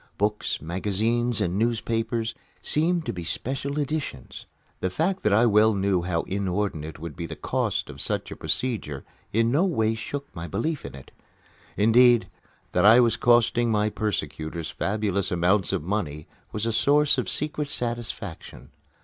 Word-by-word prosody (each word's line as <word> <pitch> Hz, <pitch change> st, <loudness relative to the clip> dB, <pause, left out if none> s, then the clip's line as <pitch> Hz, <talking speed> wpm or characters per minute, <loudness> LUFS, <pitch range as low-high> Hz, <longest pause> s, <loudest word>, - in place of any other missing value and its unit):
Books, 105 Hz, +1 st, -1 dB
magazines, 105 Hz, +7 st, 0 dB
and 90 Hz, +3 st, 0 dB
newspapers 115 Hz, 0 st, -1 dB, 0.3 s
seemed 165 Hz, +2 st, +1 dB
to -, -, -2 dB
be 90 Hz, -2 st, -6 dB
special 135 Hz, -, 0 dB
editions. 145 Hz, -, -4 dB, 0.3 s
The 95 Hz, -, -1 dB
fact 180 Hz, -, -1 dB
that 105 Hz, -, +1 dB
I 110 Hz, +4 st, +5 dB
well 110 Hz, -1 st, +4 dB
knew 95 Hz, -2 st, +1 dB
how 85 Hz, -1 st, -1 dB
inordinate 95 Hz, -5 st, -2 dB
would 80 Hz, 0 st, -7 dB
be 85 Hz, -, -5 dB
the -, -, -7 dB
cost -, -, -1 dB
of -, -, -7 dB
such -, -, -2 dB
a -, -, -5 dB
procedure 110 Hz, -, -2 dB, 0.3 s
in 115 Hz, +2 st, +2 dB
no 150 Hz, +7 st, +3 dB
way 115 Hz, -, +1 dB
shook 140 Hz, +5 st, -6 dB
my 85 Hz, +1 st, -5 dB
belief 155 Hz, -, -2 dB
in -, -, -8 dB
it. 70 Hz, -, -13 dB, 0.7 s
Indeed, 120 Hz, +3 st, +5 dB, 0.4 s
that 90 Hz, -, +2 dB
I 110 Hz, +4 st, +8 dB
was 120 Hz, -2 st, +4 dB
costing 120 Hz, 0 st, +3 dB
my 105 Hz, -1 st, +1 dB
persecutors 85 Hz, -6 st, -3 dB
fabulous 100 Hz, -2 st, -1 dB
amounts 90 Hz, +2 st, +2 dB
of -, -, -1 dB
money 80 Hz, -6 st, -3 dB, 0.3 s
was 105 Hz, +1 st, -2 dB
a 115 Hz, -, 0 dB
source 145 Hz, +3 st, +4 dB
of 125 Hz, -, -2 dB
secret 150 Hz, -1 st, +1 dB
satisfaction. 115 Hz, -8 st, -4 dB
110 Hz, 160 wpm, -25 LUFS, 95-120 Hz, 0.7 s, I